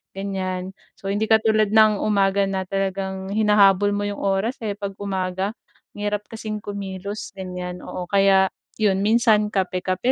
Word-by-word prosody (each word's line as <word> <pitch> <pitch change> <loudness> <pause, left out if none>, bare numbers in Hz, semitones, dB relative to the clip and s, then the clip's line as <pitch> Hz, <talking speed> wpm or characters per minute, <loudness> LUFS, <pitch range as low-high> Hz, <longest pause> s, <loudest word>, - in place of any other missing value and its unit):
ganyan. 190 -1 -3 0.3
So 195 - -7
hindi 205 +2 0
katulad 220 -1 +3
ng 215 -1 +5
umaga 200 -1 +2
na 190 -1 -2
talagang 190 0 -3
hinahabol 205 -1 +4
mo 205 - -1
'yong 205 - -4
oras, 195 +5 0
eh, 205 -1 -2
'pag 200 -1 -5
umaga. 190 +1 -2 0.4
Ang 205 - -6
hirap 210 0 -2
kasing 215 -1 -5
kumilos, 200 0 -6
ganyan, 180 -1 -6
oo. 180 - -5
Kaya 195 -1 +4 0.3
'yon 195 -3 +2
minsan 220 -2 +4
kape-kape 185 +4 0
200 Hz, 150 wpm, -23 LUFS, 190-210 Hz, 0.4 s, ng